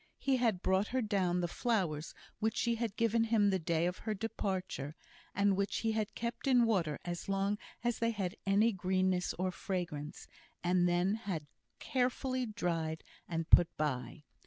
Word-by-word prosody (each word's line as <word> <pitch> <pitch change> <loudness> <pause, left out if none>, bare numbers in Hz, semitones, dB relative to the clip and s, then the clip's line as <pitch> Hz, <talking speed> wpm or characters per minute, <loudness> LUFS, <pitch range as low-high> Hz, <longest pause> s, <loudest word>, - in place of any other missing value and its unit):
He 270 -1 +1
had 225 -7 +1
brought 190 +2 +2
her 260 0 0
down 185 -4 +1
the 175 - 0
flowers 175 -7 -1 0.2
which 220 +1 0
she 235 - +2
had 230 -3 -2
given 230 0 +3
him 215 -3 +3
the 190 - +1
day 165 0 +1
of 180 +1 -2
her 215 -1 -2
departure, 190 -8 -3 0.4
and 200 0 +3
which 200 +1 -1
he 225 - +1
had 215 -1 -2
kept 235 +3 -4
in 250 -3 +5
water 175 -10 +1
as 175 +2 -4
long 195 +1 0 0.2
as 240 -1 0
they 230 - +2
had 195 -5 -2
any 205 +4 +4
greenness 185 -1 0
or 185 +1 0
fragrance, 175 -6 -4 0.4
and 175 0 +3
then 175 +3 +2 0.2
had 160 -5 -2 0.3
carefully 255 0 0
dried 165 -6 -2 0.3
and 165 -1 -3
put 175 - +6
by. 130 -1 -2
190 Hz, 170 wpm, -34 LUFS, 175-225 Hz, 0.4 s, put